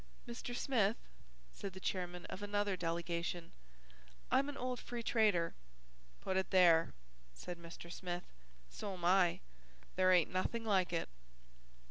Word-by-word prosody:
"Mr. 240 +1 -5
Smith," 230 -5 +2 0.6
said 195 -2 -6
the 190 - -8
chairman 180 -2 -3
of 190 - -7
another 205 -1 0
delegation, 170 0 -2 0.8
"I'm 275 +2 +3
an 290 - -6
old 250 0 -2
free 240 -1 -5
trader 210 -8 +3 0.3
" - - -29
"Put 190 - 0
it 190 - 0
there," 170 -4 +5 0.4
said 175 - -7
Mr. 170 0 -10
Smith, 175 -1 -4 0.5
"so'm 190 -4 -5
I. 180 -1 +4 0.6
There 185 0 +5
ain't 175 -3 +5
nothing 225 +5 -1
like 190 -5 +3
it." 170 - -1
185 Hz, 135 wpm, -37 LUFS, 170-205 Hz, 0.8 s, there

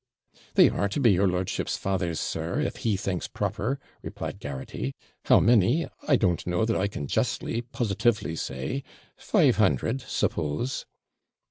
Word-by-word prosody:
'They - - +8
are 100 - 0
to 110 - -2
be 120 -6 +5
your 95 +1 +3
lordship's 90 0 -1
father's, 90 -4 -1
sir, - - -2
if - - -1
he 105 -4 0
thinks 95 -1 -2
proper,' 105 +6 -2 0.2
replied - - -6
Garraghty. 65 -2 -5 0.3
'How - - +6
many, 120 - +4 0.2
I 145 - +5
don't 90 -9 +1
know 90 +4 +1
that 115 -1 0
I 100 - +1
can 75 -7 -5
justly, 115 +10 -1
positively 115 -6 0
say 65 - -3 0.3
five - - +3
hundred, 130 +4 +2
suppose.' 120 - -2
100 Hz, 145 wpm, -27 LUFS, 90-115 Hz, 0.3 s, They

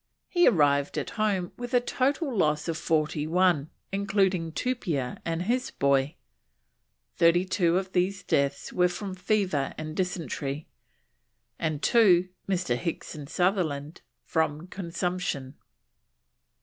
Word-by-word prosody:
He 350 -1 +4
arrived 145 -4 +3
at - - -3
home 200 -5 0
with 245 +1 -3
a - - +7
total 265 +3 0
loss 150 -4 +1
of 165 - -1
forty 155 -1 0
one, 170 -3 +2 0.2
including 195 -4 +1
Tupia 160 - -2
and 165 +1 -2
his 250 +5 0
boy; 140 +1 +1 1.0
thirty 170 +2 +4
two 180 -2 +2
of 190 0 -3
these 185 +1 0
deaths 140 0 0
were 180 0 +4
from 195 +1 -5
fever 185 -7 0
and 155 0 -5
dysentery, 155 -5 -3 0.9
and 155 -3 -2
2, 185 -6 +5 0.2
Mr. 185 -9 +1
Hicks 170 +6 -4
and 145 -2 -8
Sutherland, 165 -5 0 0.2
from 160 -1 -1
consumption. 175 -7 -3
175 Hz, 125 wpm, -27 LUFS, 150-195 Hz, 1.0 s, a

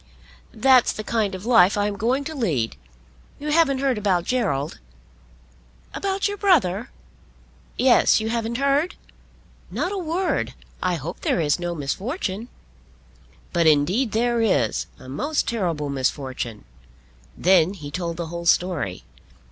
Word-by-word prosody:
"That's 255 +2 +5
the 215 - -6
kind 210 -3 -1
of 185 +3 -8
life 225 -5 +5
I'm 205 0 0
going 245 +7 0
to 315 +3 -5
lead. 155 - -1 0.6
You 300 - -5
haven't 300 -3 +3
heard 265 -5 +1
about 190 -4 +1
Gerald?" 155 - -1 1.1
"About 395 0 -1
your 405 0 -4
brother?" 255 - +2 0.9
"Yes 250 -3 +5
you 220 0 -2
haven't 230 0 -2
heard?" 280 +5 +1 0.7
"Not 360 - -2
a 400 - -2
word. 355 +2 -1 0.3
I 180 -1 +1
hope 165 +3 -6
there - - 0
is 150 0 +1
no 175 -1 -3
misfortune." 195 - -3 1.1
"But 170 -1 +3
indeed 175 - +3
there 235 +2 +1
is, 140 - +1
a - - -13
most 290 - -1
terrible 170 -10 -1
misfortune." 130 -4 -3 0.7
Then 185 0 +4
he 145 -6 -8
told 170 0 -3
the 170 -2 -4
whole 170 0 -4
story. 160 - +1
205 Hz, 135 wpm, -23 LUFS, 165-260 Hz, 1.1 s, That's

